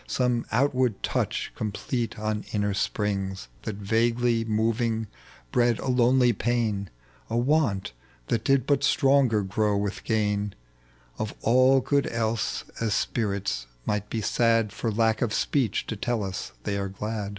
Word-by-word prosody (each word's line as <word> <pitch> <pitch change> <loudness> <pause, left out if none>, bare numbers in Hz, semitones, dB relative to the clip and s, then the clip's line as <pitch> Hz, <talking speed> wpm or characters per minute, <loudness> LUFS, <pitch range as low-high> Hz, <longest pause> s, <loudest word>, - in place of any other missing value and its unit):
Some 125 -2 0
outward 125 -3 +1
touch - - -1
complete 110 +3 -3
on 110 0 -2
inner 105 -1 +1
springs 95 - -2
That 110 - -4
vaguely 115 +3 +1
moving 110 +1 0 0.5
bred 120 -2 +3
a - - -4
lonely 125 0 +4
pain, 110 -3 -1 0.4
A 115 - 0
want 120 - +1 0.3
that 110 - -1
did 135 -1 +3
but 145 - +2
stronger 135 -6 +3
grow 105 +1 +1
with 100 0 -3
gain 105 -2 0 0.6
Of 110 - -3
all 130 +3 +5
good 140 +1 +1
else, 115 -1 -1 0.2
as 110 -3 0
spirits 100 - -1 0.2
might 105 0 -1
be 115 - -2
sad 115 -1 +2
For 115 - -2
lack 110 +1 +1
of 115 -4 0
speech 125 -9 0
to 115 - -4
tell 115 +2 -1
ua 95 -2 -3 0.3
they 100 - -1
are 100 0 -2
glad. 105 +1 -4
110 Hz, 145 wpm, -26 LUFS, 105-120 Hz, 0.6 s, all